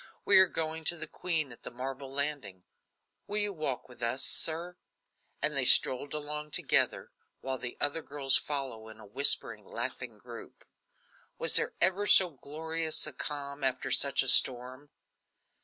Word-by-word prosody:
We 200 - +6
are 190 - +6
going 160 -1 -3
to 175 - 0
the - - -6
queen 160 -6 -3
at 120 - -14
the - - -8
marble 130 +2 -8
landing. 140 -10 -5 0.6
Will 210 - -2
you 205 -1 0
walk 150 -7 -4
with 125 -1 -18
us, 120 +3 -1
sir?" 170 +2 -3 0.7
And 150 0 0
they 135 - +4
strolled 135 +4 +4
away 150 0 -1
together, - - +1 0.3
while 130 -1 -5
the 120 - -8
other 145 +3 +1
girls 140 -3 +1
followed 130 -7 -3
in 110 - -15
a 110 - -14
whispering, 135 +8 +2
laughing - - -7
group. - - -14 0.7
Was - - +1
there - - +5
ever 195 +2 +1
so 190 -3 +4
glorious 160 +3 -3
a 155 - -5
calm 140 +1 -6
after 130 -1 -1
such - - +3
a - - -7
storm? 130 +3 +3
145 Hz, 160 wpm, -29 LUFS, 130-160 Hz, 0.7 s, We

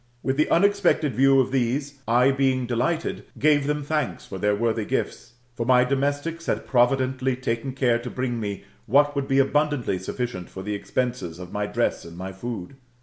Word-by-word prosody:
With 130 - 0
the 155 - +2
unexpected 190 -6 +3
view 135 +3 +5
of 130 -1 +1
these 135 +2 -1
I, 125 +4 +4
being 135 -2 +1
delighted, 125 +7 -1
gave 145 -2 +3
them 150 0 -1
thanks 150 -2 -2
for 95 - -7
their 105 +1 +2
worthy 115 0 0
gifts: 110 - -3 0.2
for 120 - -3
my 125 +1 +5
domestics 145 +5 -1
had - - -1
providently 130 +1 +2
taken 125 +1 -3
care 125 -3 +2
to 120 +1 -6
bring 125 -2 -2
me 100 -3 -4 0.2
what 145 +4 +4
would 140 -1 -1
be 135 - +1
abundantly 140 -6 +1
suflkient 95 -2 -4
for 95 - -8
the 105 +1 -3
expenses 105 -4 -3
of 90 0 -9
my 105 0 -2
dress - - -1
and 85 0 -11
my 95 +1 -5
food. 115 +3 -6
130 Hz, 185 wpm, -24 LUFS, 115-140 Hz, 0.2 s, view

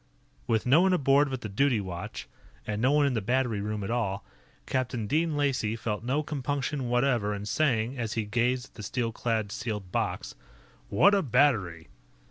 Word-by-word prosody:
With 110 -2 +1
no 140 +7 +5
one 190 0 +3
aboard 140 -3 +3
but 130 -2 -4
the - - -4
duty 120 +4 +2
watch, 95 - -6 0.4
and 105 0 -3
no 130 +3 +3
one 145 0 +4
in 140 - +1
the 115 - 0
battery 120 -1 0
room 105 0 -3
at 95 - -3
all, 100 -5 -1 0.4
Captain 125 -3 -2
Dean 155 +6 0
Lacey 130 -7 0
felt 110 -1 -3
no 135 +5 0
compunction 140 -2 -2
whatever 120 -4 +1
in 100 0 -6
saying, 120 0 0
as 115 -2 -2
he 110 -2 -1
gazed 120 +4 0
at - - -36
the 110 - -10
steel 115 +3 -2
clad, 110 -2 -2
sealed 105 -5 -4
box: - - -2 0.6
"What 200 - +5
a 200 - +4
battery!" 115 - +1
120 Hz, 185 wpm, -28 LUFS, 105-140 Hz, 0.6 s, no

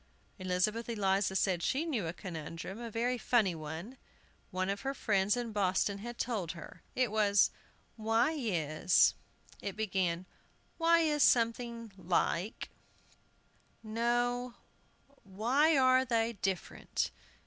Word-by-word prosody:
Elizabeth 185 +6 0
Eliza 195 -3 +1
said 185 -3 +1
she 275 - 0
knew 240 - -1
a - - -1
conundrum, 175 +2 -7
a 235 - -5
very 240 +3 -1
funny 220 -6 +2
one, 160 - -7 0.5
one 185 0 -2
of 200 +1 -2
her 270 0 -3
friends 205 -1 +1
in 240 -2 -3
Boston 200 0 +1
had 240 +3 -7
told 210 -9 -2
her. 170 - -11
It 250 -4 +1
was, 205 -2 +4 0.5
"Why 225 +6 +2
is 175 - +2 0.2
" - - -23
It 200 - -4
began, 185 -4 -1 0.5
"Why 335 0 +5
is 300 -2 +1
something 230 -2 +2
like 180 +2 -1 1.1
no, 240 +2 0 0.7
Why 250 +11 +2
are 255 0 +5
they 230 -2 +1
different?" 190 -5 -2
215 Hz, 125 wpm, -32 LUFS, 185-240 Hz, 1.1 s, Why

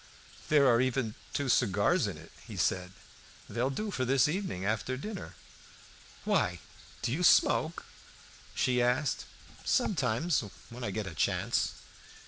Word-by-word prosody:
"There 145 -3 +5
are 120 -1 +5
even 130 -4 0 0.2
two 140 - -1
cigars 100 -4 +3
in - - -5
it," - - -13 0.3
said 90 0 0 0.6
he; - - -12
"they'll 120 +3 +1
do 210 +10 -3
for 130 - -1
this 135 +3 +4
evening 150 - -2
after 110 +5 -1
dinner." 205 +7 -7 0.9
"Why, - - +1 0.5
do 120 - 0
you 150 +8 -1
smoke?" 165 -1 +4 0.7
she 125 -1 +2
asked. 125 +4 +1 0.4
"Sometimes, 150 - +1 0.3
when 125 +1 -8
I 105 - -1
get 105 +2 -3
a 95 - -6
chance." - - 0
130 Hz, 135 wpm, -31 LUFS, 115-150 Hz, 0.9 s, There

